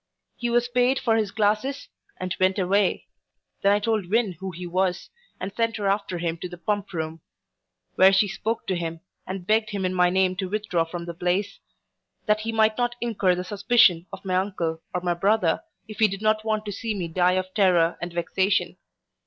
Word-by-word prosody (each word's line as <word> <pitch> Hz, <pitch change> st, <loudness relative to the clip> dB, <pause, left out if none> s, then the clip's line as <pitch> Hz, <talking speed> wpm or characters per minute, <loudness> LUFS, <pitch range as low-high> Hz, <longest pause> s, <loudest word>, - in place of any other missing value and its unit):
He 240 Hz, -, -2 dB
was 240 Hz, 0 st, +2 dB
payed 250 Hz, +2 st, +2 dB
for 225 Hz, -3 st, +1 dB
his 215 Hz, -3 st, +1 dB
glasses, 215 Hz, +7 st, 0 dB, 0.3 s
and 185 Hz, 0 st, -3 dB
went 185 Hz, +1 st, +2 dB
away. 195 Hz, +1 st, +1 dB, 0.6 s
Then 200 Hz, -, +4 dB
I 205 Hz, -, +4 dB
told 210 Hz, -4 st, -1 dB
Win 220 Hz, -1 st, +2 dB
who 190 Hz, 0 st, -4 dB
he 180 Hz, 0 st, -7 dB
was, 180 Hz, +1 st, -1 dB, 0.3 s
and 195 Hz, +2 st, -5 dB
sent 230 Hz, -1 st, 0 dB
her 205 Hz, -2 st, -1 dB
after 195 Hz, -2 st, 0 dB
him 170 Hz, -1 st, -2 dB
to 180 Hz, -, -6 dB
the 175 Hz, -, -9 dB
Pump 200 Hz, +3 st, -2 dB
room; 160 Hz, -2 st, -4 dB, 0.8 s
where 190 Hz, +1 st, +7 dB
she 195 Hz, +2 st, +4 dB
spoke 220 Hz, +4 st, -3 dB
to 190 Hz, -, -1 dB
him, 165 Hz, -1 st, -4 dB, 0.3 s
and 185 Hz, -1 st, -5 dB
begged 215 Hz, +2 st, +2 dB
him 200 Hz, -2 st, -2 dB
in 185 Hz, -, 0 dB
my 180 Hz, -1 st, +4 dB
name 185 Hz, 0 st, +2 dB
to 190 Hz, -1 st, -3 dB
withdraw 200 Hz, -5 st, 0 dB
from 170 Hz, +1 st, -6 dB
the 170 Hz, -, -5 dB
place, 180 Hz, +4 st, -1 dB, 0.7 s
that 215 Hz, -1 st, +2 dB
he 225 Hz, +1 st, -3 dB
might 220 Hz, 0 st, +2 dB
not 240 Hz, 0 st, 0 dB
incur 200 Hz, -6 st, +1 dB
the 180 Hz, -, -3 dB
suspicion 195 Hz, -3 st, +3 dB
of -, -, -9 dB
my 185 Hz, -1 st, +1 dB
uncle 175 Hz, -4 st, -2 dB
or 180 Hz, -, -2 dB
my 175 Hz, -1 st, 0 dB
brother, 200 Hz, +6 st, +2 dB, 0.3 s
if 215 Hz, -, -10 dB
he 220 Hz, -, +6 dB
did 195 Hz, +1 st, -6 dB
not 215 Hz, 0 st, +2 dB
want 215 Hz, -1 st, -1 dB
to 205 Hz, -, -4 dB
see 220 Hz, +2 st, -3 dB
me 180 Hz, -4 st, -3 dB
die 180 Hz, +2 st, +2 dB
of 185 Hz, 0 st, -2 dB
terror 180 Hz, -5 st, +3 dB
and 175 Hz, 0 st, -4 dB
vexation. 185 Hz, +3 st, 0 dB
195 Hz, 210 wpm, -25 LUFS, 180-215 Hz, 0.8 s, where